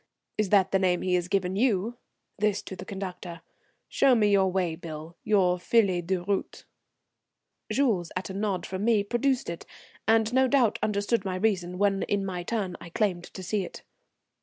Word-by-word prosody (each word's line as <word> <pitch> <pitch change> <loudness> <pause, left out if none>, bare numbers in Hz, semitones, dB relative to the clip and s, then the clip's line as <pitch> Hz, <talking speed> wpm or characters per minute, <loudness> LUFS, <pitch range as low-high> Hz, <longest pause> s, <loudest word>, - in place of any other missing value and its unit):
Is 215 -3 0
that 195 -2 +4
the 195 - +3
name 180 -2 +1
he 185 - 0
has 180 -1 +1
given 190 -1 0
you?" 230 +1 +1 0.4
this 210 -1 +1
to 190 - -7
the 185 - -9
conductor. 180 -3 -6 0.5
"Show 270 -2 +4
me 210 -3 +3
your 190 -2 +4
way 180 -3 0
bill, 160 0 -8
your 185 -4 +3
feuille 190 -3 +2
de 190 +3 0
route." 200 +1 -3 1.1
Jules 210 -11 +1
at 185 +1 -3
a - - -6
nod 195 -2 -2
from 190 +1 -4
me 220 -3 +3
produced 245 +5 0
it, 170 0 -5 0.4
and 225 +1 +3
no 260 0 +4
doubt 255 -5 +3
understood 210 +1 0
my 190 -2 -2
reason 185 -3 0
when 200 0 +2
in 200 -1 -1
my 180 -2 -3
turn 190 -2 -2
I 170 - -9
claimed 180 -1 -1
to 190 - -9
see 200 +2 -1
it. - - -9
195 Hz, 185 wpm, -27 LUFS, 180-215 Hz, 1.1 s, that